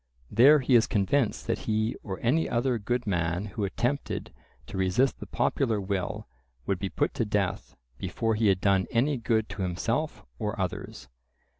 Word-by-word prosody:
There 135 +7 +7
he 130 0 +1
is 115 -2 +6
convinced 110 +4 +1
that - - -1
he 110 +1 +1
or 95 -4 -6
any 145 +8 +2
other 120 0 +1
good 120 +4 -1
man 85 -1 0
who 105 +1 -4
attempted 120 +8 -2 0.3
to - - -9
resist 95 +8 +1
the - - -8
popular 110 -3 0
will 95 -2 -3 0.4
would 95 +3 -1
be 95 - -2
put - - 0
to - - 0
death 105 -3 -2 0.2
before 115 -1 -1
he 110 0 +2
had 95 -2 +3
done 95 -2 +3
any 135 +5 +1
good 110 -2 0
to 100 - -6
himself 90 -1 -2
or - - -3
others. - - -4
110 Hz, 170 wpm, -28 LUFS, 95-120 Hz, 0.4 s, There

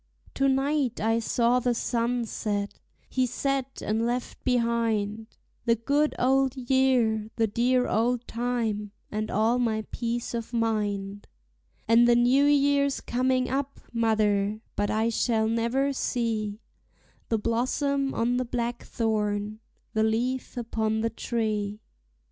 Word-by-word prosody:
To 275 - +2
night 270 -2 +1
I 225 +2 +2
saw 235 +2 +2
the 245 -1 0
sun 235 +1 0
set, 205 -2 -3 0.3
he 255 -1 0
set 270 +1 -2
and 220 +2 0
left 240 +1 -3
behind 230 -3 0 0.4
The 230 -1 +4
good 285 +7 +1
old 265 +1 +2
year, 245 -4 +2
the 225 - +2
dear 250 +4 +1
old 240 +2 +1
time, 225 -4 -2 0.2
and 215 0 -2
all 225 +4 +2
my 220 -3 0
peace 235 0 -3
of 230 0 -4
mind; 205 -3 -1 0.6
And 230 +2 +6
the 240 - +5
new 250 +4 +4
year's 280 -1 +3
coming 255 +1 0
up, 275 +2 -2
mother; 215 -2 +1
but 205 0 0
I 220 +1 +1
shall 225 -1 +1
never 235 +5 +1
see 220 -5 -2 0.7
The 225 - +2
blossom 270 +5 0
on 245 +2 +1
the 255 - 0
blackthorn, 220 -3 -2 0.3
the 220 - +1
leaf 240 +4 -1
upon 220 -2 -1
the 230 0 0
tree. 215 -3 -2
235 Hz, 130 wpm, -27 LUFS, 220-250 Hz, 0.7 s, And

